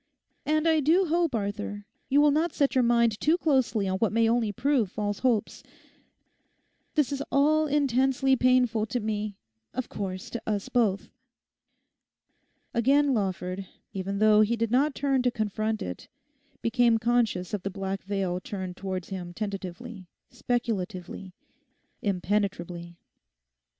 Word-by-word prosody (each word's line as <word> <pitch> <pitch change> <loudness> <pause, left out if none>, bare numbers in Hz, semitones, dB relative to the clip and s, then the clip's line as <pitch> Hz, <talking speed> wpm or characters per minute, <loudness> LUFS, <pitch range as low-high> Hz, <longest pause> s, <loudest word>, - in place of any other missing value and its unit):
And 310 +1 +2
I 320 -1 +4
do 330 +6 +3
hope, 335 -4 +1
Arthur, 205 0 -4 0.2
you 285 +2 +5
will 295 0 +5
not 315 +3 +1
set 280 -4 +1
your 255 - +3
mind 235 -2 +3
too 320 +3 +3
closely 260 - +1
on 190 0 -1
what 225 - +2
may 225 +1 +3
only 230 -2 +1
prove 240 -2 +1
false 205 -1 -3
hopes. 240 -5 0 1.3
This 295 -5 +2
is 280 -1 -2
all 310 +2 +3
intensely 270 -1 +2
painful 250 -3 +2
to 245 +3 -2
me; 210 -2 -3 0.4
of 255 0 -3
course, 185 -2 -5
to 235 - -4
us 205 -2 -2
both.' 215 -6 +1 1.6
Again 275 +4 +3
Lawford, 190 -3 -2 0.3
even 195 +1 -3
though 215 0 +5
he 215 +2 +2
did 230 -1 -1
not 275 +4 +2
turn 275 -2 +1
to 250 - +2
confront 215 -1 -2
it, 90 -1 -7 0.6
became 230 0 +3
conscious 225 -6 0
of 205 - -1
the 195 - -3
black 195 0 -4
veil 190 -2 -2
turned 185 -2 -6
towards 185 -2 -4
him 180 -3 -6
tentatively, 195 0 -6 0.2
speculatively, 205 -7 -3 0.7
impenetrably. 180 -3 -2
220 Hz, 140 wpm, -27 LUFS, 195-260 Hz, 1.6 s, you